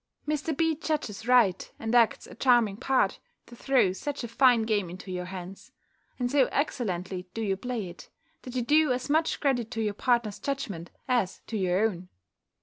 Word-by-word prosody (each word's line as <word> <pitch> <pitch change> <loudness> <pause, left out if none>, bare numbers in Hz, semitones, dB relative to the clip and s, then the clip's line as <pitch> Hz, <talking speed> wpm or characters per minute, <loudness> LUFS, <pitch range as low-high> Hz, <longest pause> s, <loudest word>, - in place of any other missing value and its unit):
Mr. 300 0 -1
B. 325 -1 +2
judges 290 -9 -3
right, 235 -7 +3
and 225 +1 -3
acts 235 -3 +4
a - - -12
charming 235 -5 +3
part, 260 +4 +1 0.3
to 240 - -13
throw 250 -7 +2
such 285 +7 -4
a - - -3
fine 240 0 +4
game 210 -5 0
into 185 +2 -8
your 180 0 -3
hands. 185 +1 -9 0.5
And 245 -1 -1
so 275 -2 +5
excellently 185 - -2
do 225 - -3
you 195 -2 0
play 225 -1 -4
it, 175 - -12 0.3
that 250 0 -9
you 250 - 0
do 300 +3 +4
as 255 +3 -2
much 315 +2 +2
credit 245 -6 0
to 225 - -3
your 210 -1 -1
partner's 235 -2 0
judgment 235 - -4 0.2
as 240 -8 0
to 225 - -6
your 190 +1 +2
own. 180 -3 -7
230 Hz, 185 wpm, -28 LUFS, 195-265 Hz, 0.5 s, so